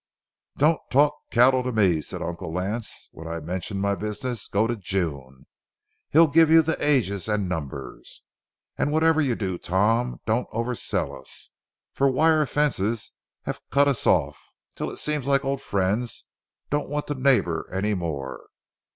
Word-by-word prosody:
"Don't 155 +2 +3
talk 145 +2 +4 0.2
cattle 125 +2 +4
to 125 0 -2
me," 95 -8 +3
said - - -6
Uncle 85 -1 -5
Lance, 100 +6 -4
when 80 - -10
I 85 0 -4
mentioned 90 +5 -4
my 100 0 +2
business; 105 +3 -4
"go 105 +3 +1
to 120 +1 -1
June—he'll 85 - -2
give 160 +2 +5
you 165 0 +7
the 160 +1 0
ages 110 -10 +1
and 105 -3 0
numbers. 80 -7 -6 0.6
And 145 - +1
whatever 160 +1 +3
you 130 -5 +1
do, 95 -5 -3
Tom, 110 +7 +1
don't 115 +3 0
oversell 115 +2 -2
us, - - -11 0.4
for 135 0 +2
wire 155 +2 +3
fences 115 -8 0 0.3
have - - -5
cut 140 +1 +4
us 140 -5 0
off, - - +2 0.3
until - - -4
it - - -8
seems 150 -3 -2
like 140 0 +2
old 135 0 -1
friends 100 +5 -1 0.5
don't 145 +1 -1
want 150 +1 -2
to 145 - -2
neighbor 125 - +1
any 105 +3 0
more. 75 -8 -4
115 Hz, 155 wpm, -25 LUFS, 95-140 Hz, 0.6 s, you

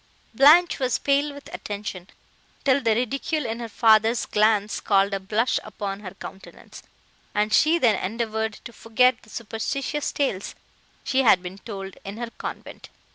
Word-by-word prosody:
Blanche 305 +8 +6
was 255 -2 +1
pale 285 +1 +1
with 285 0 -12
attention, 200 -3 -6 0.6
till 275 0 +3
the 225 -3 +2
ridicule 275 +5 -1
in 225 0 -3
her 230 -1 -6
father's 220 +1 +3
glance 210 -1 +1
called 200 0 +2
a 195 - -1
blush 215 +5 0
upon 195 -2 -5
her 195 -2 -9
countenance, 195 0 -11 0.5
and 210 +1 +1
she 320 +3 +5
then 230 - +2
endeavoured 220 +2 -2
to 235 - -9
forget 250 +4 +2
the 215 - -20
superstitious 250 +7 -3
tales 210 -9 -2 0.5
she 265 0 +1
had 215 -7 +5
been 185 +2 -8
told 195 -3 -8
in 200 +2 -7
her 235 0 -5
convent. - - -8
225 Hz, 155 wpm, -24 LUFS, 205-260 Hz, 0.6 s, Blanche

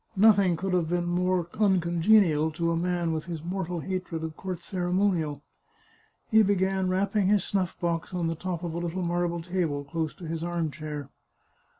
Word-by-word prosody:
Nothing 200 -4 +5
could 190 +2 -2
have 170 -3 +1
been 175 0 0
more 180 0 +1
uncongenial 175 -4 +4
to 170 +1 0
a - - +1
man 175 0 0
with 155 -1 -3
his 165 -3 -6
mortal 180 -1 -3
hatred 180 -3 -4
of 160 -1 -5
court 185 +1 -4
ceremonial. 180 -5 -1 0.9
He 220 0 +7
began 190 -2 +1
rapping 195 +1 +1
his 205 -2 +3
snuff 190 -4 -2
box 170 -1 -1
on 180 -2 -1
the 165 - 0
top 175 +1 -4
of 170 -2 -3
a 170 - -2
little 175 +2 -3
marble 170 -1 -1
table, 165 -5 -1
close 160 +1 -3
to 175 - -10
his 165 0 -3
arm 170 -2 -1
chair. 150 -2 -6
175 Hz, 180 wpm, -27 LUFS, 165-185 Hz, 0.9 s, He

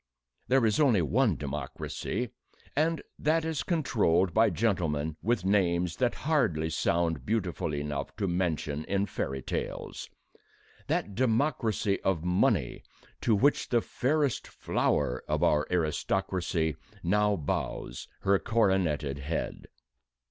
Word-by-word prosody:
There 130 -2 +4
is 110 -1 +2
only 120 - +4
one 75 - +2
democracy, - - -4 0.5
and 160 +2 +1 0.2
that 160 +2 +2
is 160 -3 -1
controlled 100 - +2
by 110 0 +5
gentlemen 80 -7 0
with 115 -1 0
names 90 -3 +2
that 125 -2 +1
hardly 110 - +1
sound 85 -3 0
beautiful 100 -7 -1
enough 75 -1 -3
to 100 -2 -1
mention 80 -4 -1
in 100 0 0
fairy 65 -8 -4
tales - - -4 0.8
that 100 - -1
democracy 115 -4 +1
of 90 -4 0
money 90 -8 +1 0.4
to 115 - +3
which 140 +8 +2
the 120 - +4
fairest 140 +3 0
flower 60 +1 0
of - - 0
our 75 0 +3
aristocracy 80 -1 0 0.3
now 105 +3 +3
bows 60 -6 -3
her 100 0 +3
coroneted 90 -11 +1
head. 75 +4 -4
95 Hz, 120 wpm, -29 LUFS, 80-115 Hz, 0.8 s, by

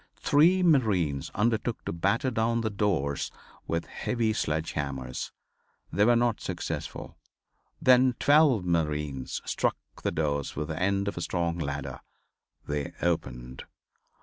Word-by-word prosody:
Three 175 +6 +4
marines 100 - +2
undertook 115 +2 0
to - - -2
batter 100 +9 +1
down 115 0 +1
the 110 -1 -1
doors 90 -9 0 0.4
with 85 0 -1
heavy 115 -3 -1
sledge 80 -4 -1
hammers. 65 -3 -4 0.6
They 100 +4 +4
were 120 +1 +5
not 120 -1 +1
successful. - - -5 0.6
Then 125 0 +5
twelve 145 - +4
marines 75 -6 -1
struck - - 0 0.2
the - - 0
doors 75 -4 -1
with 75 0 -3
the 80 - -3
end 100 +1 +1
of 100 - -3
a - - -2
strong 85 -1 -1
ladder. 70 -3 -4 0.7
They 75 -1 -3
opened. 65 -7 -2
85 Hz, 130 wpm, -28 LUFS, 75-115 Hz, 0.7 s, were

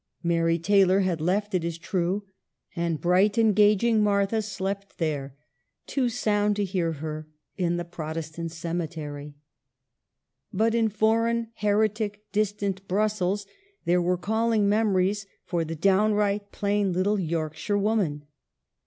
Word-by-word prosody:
Mary 165 -1 +2
Taylor 195 +2 +4
had 180 -4 -1
left, 200 +5 0
it 180 -3 +1
is 170 -1 -3
true, 185 +3 -1 0.5
and 170 -3 -1
bright, 185 +4 +3
engaging 215 0 +4
Martha 205 +1 +2
slept 200 -1 -4
there, 145 -5 -2 0.5
too 260 -3 0
sound 210 -3 +1
to 205 - 0
hear 175 -4 -1
her, 155 0 -6 0.3
in 175 -2 0
the 175 - -3
Protestant 165 0 -5
cemetery. 160 -3 -5 1.2
But 220 +3 +1
in 230 -1 +2
foreign, 230 +2 +1
heretic, 210 0 0
distant 200 -2 -1
Brussels 205 0 0 0.4
there 175 +1 +3
were 180 +1 +1
calling 220 +2 +1
memories 200 -1 +1 0.2
for 170 -2 -1
the 165 +1 -5
downright, 205 +3 +2
plain 200 -1 0
little 200 +3 +1
Yorkshire 160 +2 -2
woman. 195 -8 0
195 Hz, 125 wpm, -26 LUFS, 170-210 Hz, 1.2 s, Taylor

